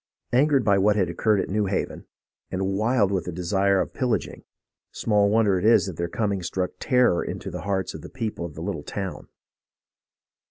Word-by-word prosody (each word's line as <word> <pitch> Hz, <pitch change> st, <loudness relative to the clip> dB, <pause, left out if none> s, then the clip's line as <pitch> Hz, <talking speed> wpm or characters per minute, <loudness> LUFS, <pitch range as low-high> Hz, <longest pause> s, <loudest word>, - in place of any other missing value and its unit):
Angered 140 Hz, +1 st, +3 dB
by 100 Hz, -2 st, +4 dB
what 105 Hz, +2 st, +3 dB
had 95 Hz, -5 st, +1 dB
occurred 105 Hz, +3 st, +2 dB
at -, -, -1 dB
New 105 Hz, +1 st, 0 dB
Haven, 95 Hz, 0 st, -3 dB, 0.4 s
and 95 Hz, +1 st, -1 dB
wild 110 Hz, -1 st, +2 dB
with 95 Hz, -3 st, -1 dB
the 90 Hz, -, -4 dB
desire 95 Hz, +3 st, +1 dB
of -, -, -2 dB
pillaging, 125 Hz, -3 st, -2 dB, 0.5 s
small 105 Hz, -2 st, +2 dB
wonder 105 Hz, -3 st, +3 dB
is 110 Hz, +2 st, +4 dB
it -, -, -3 dB
that 80 Hz, -, -13 dB
their 85 Hz, -, 0 dB
coming 100 Hz, -1 st, -1 dB
struck 90 Hz, +1 st, -2 dB
terror 125 Hz, -8 st, +3 dB
to -, -, -5 dB
the -, -, -5 dB
hearts 95 Hz, -1 st, -2 dB
of -, -, -8 dB
the -, -, -10 dB
people 105 Hz, -6 st, -4 dB
in 80 Hz, -, -12 dB
the 80 Hz, -, -7 dB
little 90 Hz, -5 st, -3 dB
town. 95 Hz, +1 st, -6 dB
100 Hz, 195 wpm, -25 LUFS, 95-110 Hz, 0.5 s, by